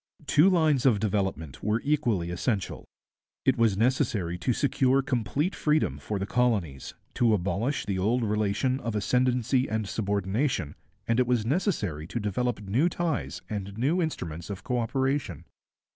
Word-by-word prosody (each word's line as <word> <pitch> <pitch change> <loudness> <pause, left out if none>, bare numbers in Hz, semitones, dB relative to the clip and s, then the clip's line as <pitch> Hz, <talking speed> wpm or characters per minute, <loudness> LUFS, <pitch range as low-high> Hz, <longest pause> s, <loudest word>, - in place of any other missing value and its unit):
Two 155 +6 +5
lines 155 -7 +3
of 110 -6 +4
development 95 - -2
were 105 +2 +1
equally 120 - 0
essential. 100 +2 -2 0.6
It 130 -1 +4
was 115 -5 +2
necessary 115 - +1
to 125 - 0
secure 135 +1 +2
complete 135 - -1
freedom 150 - +1
for 105 +8 -3
the 95 - -2
colonies, 100 - 0 0.2
to 115 -3 +3
abolish 100 +9 -1
the 95 -2 -2
old 115 +6 +1
relation 105 +5 0
of 115 -4 -4
ascendancy 125 +4 +1
and 110 -1 -1
subordination, 100 - -1 0.3
and 115 +1 +2
it 125 - +3
was 120 -3 +1
necessary 115 - -1
to 120 - -3
develop 110 +2 -1
new 120 - +2
ties 170 -4 -3
and 100 -2 -5
new 150 +10 +1
instruments 85 - -4
of 100 -1 -6
co 125 -1 -1
operation. 130 - -1
115 Hz, 150 wpm, -27 LUFS, 100-130 Hz, 0.6 s, Two